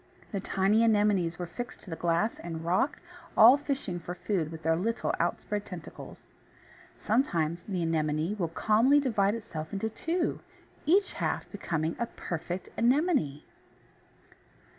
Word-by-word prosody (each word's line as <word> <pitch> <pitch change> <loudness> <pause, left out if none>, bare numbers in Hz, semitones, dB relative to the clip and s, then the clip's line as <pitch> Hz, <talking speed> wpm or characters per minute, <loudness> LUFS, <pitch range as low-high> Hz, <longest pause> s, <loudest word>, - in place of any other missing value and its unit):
The 200 - -2
tiny 195 +3 +2
Anemones 205 -6 +3
were 180 - -3
fixed 240 +8 -7
to 185 - -11
the - - -2
glass 170 +7 0
and 165 -1 -6
rock, 185 - +1 0.4
all 235 +4 +10
fishing 275 -11 -3
for 175 +1 -6
food 175 -3 -1
with 160 0 -9
their 160 +1 +3
little 220 +7 -1
outspread 210 -1 -1
tentacles. 180 -5 -10 0.7
Sometimes 175 - 0
the 185 -4 -1
Anemone 155 +2 0
will 170 - +1
calmly 220 - +4
divide 215 -7 +1
itself 165 -9 -6
into 220 +3 -2
two, 335 +9 -1 0.5
each 385 +5 +3
half - - -2
becoming 165 -5 -2
a 235 - 0
perfect 175 -2 -5
Anemone! 250 - +2
195 Hz, 140 wpm, -29 LUFS, 165-230 Hz, 0.7 s, all